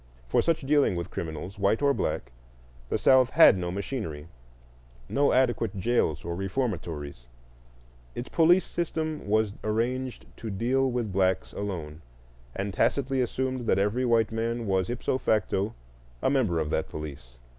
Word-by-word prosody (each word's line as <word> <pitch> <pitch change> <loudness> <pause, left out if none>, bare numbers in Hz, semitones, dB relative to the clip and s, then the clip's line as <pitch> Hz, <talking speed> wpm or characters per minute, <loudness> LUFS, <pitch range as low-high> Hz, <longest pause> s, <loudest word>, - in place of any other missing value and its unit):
For - - +3
such 165 -1 +1
dealing 140 -7 +3
with 85 0 -4
criminals, 85 +5 -6
white 100 +3 +2
or 140 0 +4
black, - - -2 0.6
the - - +1
South 130 -1 +5
had 160 -4 +7
no 90 -2 -3
machinery, 90 - -5 0.8
no 140 +1 +2
adequate 120 -5 +1
jails 95 -7 0
or 85 0 -3
reformatories; 85 - -3 0.9
its 120 - -5
police 175 +3 +4
system 160 - -3
was 110 0 +2
arranged 120 +4 -2
to 115 - -6
deal 125 +7 +1
with 120 -5 -2
blacks 95 -1 +1
alone, 85 -6 -5 0.5
and 100 0 -3
tacitly 135 +3 +1
assumed 130 0 -2
that - - +3
every 105 +6 +1
white 115 -3 +2
man 115 +1 -2
was 95 -2 0
ipso 125 +2 -1
facto 105 -2 0 0.5
a - - +3
member 120 -12 +2
of 75 -1 -2
that 80 - -1
police. 70 -6 -8
110 Hz, 145 wpm, -27 LUFS, 95-130 Hz, 0.9 s, had